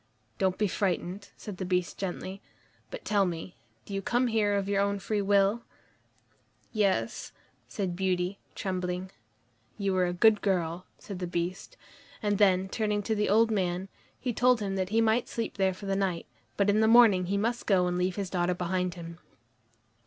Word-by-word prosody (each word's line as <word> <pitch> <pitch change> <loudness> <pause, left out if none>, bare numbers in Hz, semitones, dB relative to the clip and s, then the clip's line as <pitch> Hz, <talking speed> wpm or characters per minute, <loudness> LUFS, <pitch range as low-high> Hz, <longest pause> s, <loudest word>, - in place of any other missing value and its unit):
"Don't 185 -1 +1
be 210 - +2
frightened," 190 +1 -2
said 205 -4 -8
the 190 - -4
Beast 180 -1 -1
gently, 190 +1 -5 0.5
"but - - -8
tell 205 -2 +3
me, 175 0 -4 0.3
do 200 - -8
you 195 - -1
come 245 +5 +1
here 215 -3 +2
of 200 -1 -1
your 200 0 +2
own 200 0 +1
free 205 +1 -1
will?" 200 +3 +3 1.1
"Yes," 195 - 0 0.4
said 180 +7 -3
Beauty, 185 +1 -1 0.2
trembling. 185 0 -3 0.7
"You 200 -2 0
are 180 -1 +3
a - - -1
good 210 +3 +4
girl," 180 -3 -1
said 195 -3 -8
the 180 - -3
Beast, 175 - -4 0.5
and 205 -1 +1
then, 190 -2 +4
turning 210 0 -1
to 220 - 0
the 210 -1 0
old 225 +2 +4
man, 185 -2 -1 0.3
he 250 -2 -2
told 250 +1 +4
him 195 -2 -2
that 185 -1 -1
he 225 +2 +2
might 225 +2 +2
sleep 230 -3 -4
there 190 -1 +3
for 190 +2 -9
that 195 0 0
night, 190 -4 -1 0.3
but 200 - +2
in 205 +1 +3
the 220 - +4
morning 220 -6 +6
he 200 +2 0
must 235 +4 -1
go 185 -3 +4
and 180 0 -1
leave 180 0 0
his 195 -3 -4
daughter 180 -1 +1
behind 180 0 -1
him. 170 -1 -9
195 Hz, 185 wpm, -29 LUFS, 180-210 Hz, 1.1 s, morning